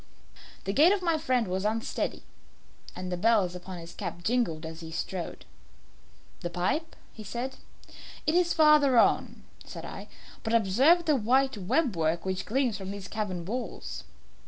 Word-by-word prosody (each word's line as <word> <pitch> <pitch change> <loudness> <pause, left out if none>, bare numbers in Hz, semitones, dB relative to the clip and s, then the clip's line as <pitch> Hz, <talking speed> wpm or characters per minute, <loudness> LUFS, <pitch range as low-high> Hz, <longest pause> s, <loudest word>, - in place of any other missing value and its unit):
The 195 - -2
gait 310 - +6
of 400 -2 +1
my 335 -2 +2
friend 255 -7 +1
was 185 +1 -2
unsteady, 220 +2 -2 0.7
and 180 0 -5
the 180 - -1
bells 205 -2 +3
upon 180 +1 -7
his 170 0 -9
cap 175 - -6
jingled 180 -9 0
as 160 0 -7
he 165 -1 -8
strode. 175 +1 -5 0.9
"The 175 - -4
pipe," 185 - -1 0.3
said 245 +6 -4 0.7
he. - - +3
"It - - -1
is 350 -1 +3
farther 300 -5 +5
on," - - +3 0.2
said - - -8
I; - - -8 0.3
"but 225 0 0
observe 260 - +4
the 305 - +4
white 265 +3 +2
web 215 - 0
work 165 +1 0
which 190 0 -2
gleams 240 -3 0
from 190 -1 -6
these 200 -1 -6
cavern 185 -4 -3
walls." 240 +6 -5
215 Hz, 160 wpm, -28 LUFS, 180-270 Hz, 0.9 s, gait